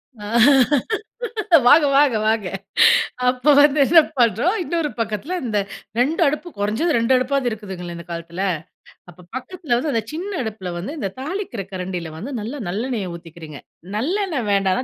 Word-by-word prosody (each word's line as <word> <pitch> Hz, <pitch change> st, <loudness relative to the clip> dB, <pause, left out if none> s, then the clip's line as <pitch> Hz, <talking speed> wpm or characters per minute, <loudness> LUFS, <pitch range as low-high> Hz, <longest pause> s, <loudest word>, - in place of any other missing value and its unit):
அ. 210 Hz, -2 st, -10 dB, 1.4 s
வாங்க 295 Hz, +4 st, +7 dB
வாங்க 280 Hz, -5 st, +4 dB
வாங்க! 220 Hz, -2 st, +1 dB, 0.8 s
அப்ப 255 Hz, +4 st, +3 dB
வந்து 295 Hz, 0 st, +5 dB
என்ன 330 Hz, +3 st, +7 dB, 0.2 s
பண்றோம், 240 Hz, -, +3 dB
இன்னொரு 335 Hz, -3 st, -2 dB
பக்கத்துல 225 Hz, -, -2 dB
இந்த 215 Hz, -4 st, 0 dB, 0.4 s
2 290 Hz, +8 st, +1 dB
அடுப்பு 300 Hz, +5 st, -1 dB
குறைஞ்சது 220 Hz, +11 st, 0 dB
2 230 Hz, +3 st, +1 dB
அடுப்பாவது 255 Hz, 0 st, 0 dB
இருக்குதுங்கள 190 Hz, -5 st, -7 dB
இந்த 170 Hz, -, -10 dB
காலத்துல? 170 Hz, +2 st, -5 dB, 0.7 s
அப்ப 175 Hz, +1 st, -17 dB
பக்கத்துல 305 Hz, -1 st, -3 dB
வந்து 285 Hz, +5 st, -1 dB
அந்த 225 Hz, -, 0 dB
சின்ன 365 Hz, +6 st, -4 dB
அடுப்புல 200 Hz, -5 st, -5 dB
வந்து, 190 Hz, +11 st, -5 dB
இந்த 195 Hz, -6 st, -3 dB
தாளிக்கற 310 Hz, -, -4 dB
கரண்டில 180 Hz, -3 st, -5 dB
வந்து 255 Hz, -, -6 dB
நல்ல 245 Hz, +7 st, -6 dB
நல்லெண்ணெய 210 Hz, -1 st, -3 dB
ஊத்திக்கிறீங்க. 165 Hz, -3 st, -11 dB, 0.4 s
நல்லெண்ணெ 340 Hz, -, -1 dB
வேண்டானா 195 Hz, +3 st, +1 dB
230 Hz, 140 wpm, -21 LUFS, 190-290 Hz, 1.4 s, வாங்க